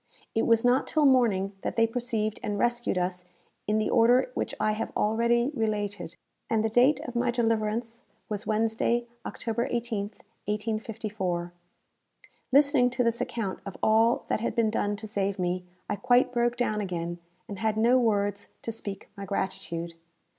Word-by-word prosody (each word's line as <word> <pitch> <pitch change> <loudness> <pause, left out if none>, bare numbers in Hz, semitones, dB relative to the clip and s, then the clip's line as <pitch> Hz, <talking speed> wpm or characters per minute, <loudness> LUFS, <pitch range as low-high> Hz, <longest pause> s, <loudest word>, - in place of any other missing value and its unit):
It 225 - +1
was 230 0 +4
not 250 +2 +3
till 310 -2 +2
morning 225 -8 +3
that - - -3
they 230 - +4
perceived 225 -2 -2
and 205 - -2
rescued 240 -2 0
us 180 0 -2 0.4
in 210 +1 +2
the 215 - 0
order 245 - +4
which - - -3
I 215 - +2
have 215 +2 -3
already 235 +4 +2
related; 205 - -2 0.3
and 220 -1 +2
the - - +1
date 250 +6 +4
of 245 - -7
my 240 +1 +1
deliverance 230 0 0 0.3
was 210 +1 -4
Wednesday, 225 +2 +1 0.2
October 235 +1 -2
18th, 225 -3 -3 0.2
1854. 210 -4 -3 1.0
Listening 280 -2 +5
to 250 0 0
this 235 0 +1
account 210 -5 -3
of 195 - -8
all 225 +2 +4
that - - 0
had 230 - -2
been 225 -2 +2
done 205 -1 0
to 215 +2 -8
save 200 -2 -1
me, 180 0 -1 0.2
I - - -2
quite 245 +5 +3
broke 240 0 +1
down 215 -3 0
again, 175 -3 -4 0.3
and 200 - -7
had 220 -1 0
no 240 +3 +5
words 205 -3 0
to 230 - -3
speak 200 -3 -6
my 200 -1 -6
gratitude. 170 -3 -3
220 Hz, 165 wpm, -28 LUFS, 205-240 Hz, 1.0 s, Listening